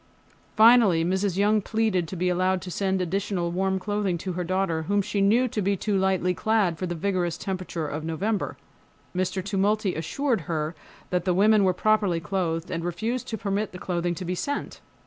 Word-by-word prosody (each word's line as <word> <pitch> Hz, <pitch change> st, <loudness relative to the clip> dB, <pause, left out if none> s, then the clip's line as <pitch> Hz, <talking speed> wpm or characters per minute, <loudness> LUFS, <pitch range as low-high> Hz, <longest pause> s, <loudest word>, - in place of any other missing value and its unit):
Finally 215 Hz, -7 st, +6 dB
Mrs. 190 Hz, +1 st, 0 dB
Young 210 Hz, +1 st, +3 dB
pleaded 215 Hz, -5 st, 0 dB
to 190 Hz, -, -6 dB
be 180 Hz, +1 st, -1 dB
allowed 185 Hz, +1 st, +1 dB
to 185 Hz, -, -6 dB
send 190 Hz, +1 st, 0 dB
additional 185 Hz, -1 st, -1 dB
warm 190 Hz, +2 st, 0 dB
clothing 205 Hz, -2 st, -1 dB
to 185 Hz, +2 st, -4 dB
her 180 Hz, +1 st, -2 dB
daughter, 185 Hz, -2 st, 0 dB
whom 205 Hz, +1 st, +2 dB
she 200 Hz, 0 st, -1 dB
knew 230 Hz, +6 st, +4 dB
to 215 Hz, -, -2 dB
be 200 Hz, +1 st, +1 dB
too 205 Hz, +2 st, -1 dB
lightly 190 Hz, -1 st, +1 dB
clad 200 Hz, -3 st, +1 dB
for 185 Hz, -, -2 dB
the 175 Hz, -, -3 dB
vigorous 175 Hz, -1 st, -1 dB
temperature 185 Hz, -4 st, -4 dB
of 150 Hz, +1 st, -4 dB
November. 190 Hz, +7 st, -2 dB, 0.6 s
Mr. 185 Hz, 0 st, -1 dB
Tumulty 200 Hz, 0 st, +1 dB
assured 230 Hz, -, -1 dB
her 155 Hz, 0 st, -2 dB, 0.4 s
that 180 Hz, -1 st, +1 dB
the 180 Hz, -2 st, +2 dB
women 210 Hz, +2 st, +5 dB
were 185 Hz, -, +4 dB
properly 205 Hz, -2 st, +2 dB
clothed, 170 Hz, -1 st, -2 dB
and 165 Hz, -1 st, -3 dB
refused 220 Hz, +9 st, -2 dB
to 220 Hz, -, -3 dB
permit 200 Hz, 0 st, -2 dB
the -, -, -6 dB
clothing 175 Hz, -1 st, -2 dB
to 185 Hz, -, -6 dB
be 180 Hz, -, -2 dB
sent. 285 Hz, +10 st, -4 dB
190 Hz, 190 wpm, -26 LUFS, 175-205 Hz, 0.6 s, Finally